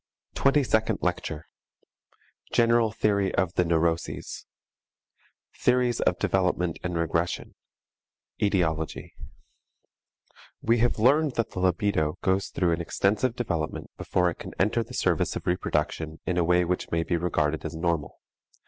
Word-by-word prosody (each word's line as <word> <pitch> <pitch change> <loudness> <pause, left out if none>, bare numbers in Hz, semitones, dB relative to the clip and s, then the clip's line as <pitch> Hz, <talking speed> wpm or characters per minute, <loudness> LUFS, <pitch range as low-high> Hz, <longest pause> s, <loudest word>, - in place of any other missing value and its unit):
TWENTY 140 +1 +3
SECOND 110 -2 +1
LECTURE 75 - -2 1.1
GENERAL 115 -1 +4
THEORY 100 -3 +1
OF 90 -2 +1
THE 90 - +2
NEUROSES 85 0 -1 1.1
Theories 125 -1 +2
of - - +2
Development 90 -3 0
and 90 -1 -2
Regression 85 +1 -1 0.9
Etiology 80 -6 0 1.5
We 115 +1 +2
have 120 +1 +2
learned 140 +6 +3
that 115 -2 -1
the - - -5
libidio 90 -4 +1
goes 95 +1 +1
through 90 -2 0
an 85 +1 0
extensive 105 +8 0
development 85 -11 -3
before 90 -1 +1
it - - -11
can - - -8
enter 105 +5 +2
the 115 - -7
service - - +1
of - - -5
reproduction 80 -2 -1
in 90 - -1
a - - +3
way 90 +1 +3
which 90 +1 -2
may 85 0 0
be 85 - -1
regarded 80 -3 0
as 80 -1 -5
normal. 80 -3 -2
90 Hz, 135 wpm, -26 LUFS, 85-110 Hz, 1.5 s, GENERAL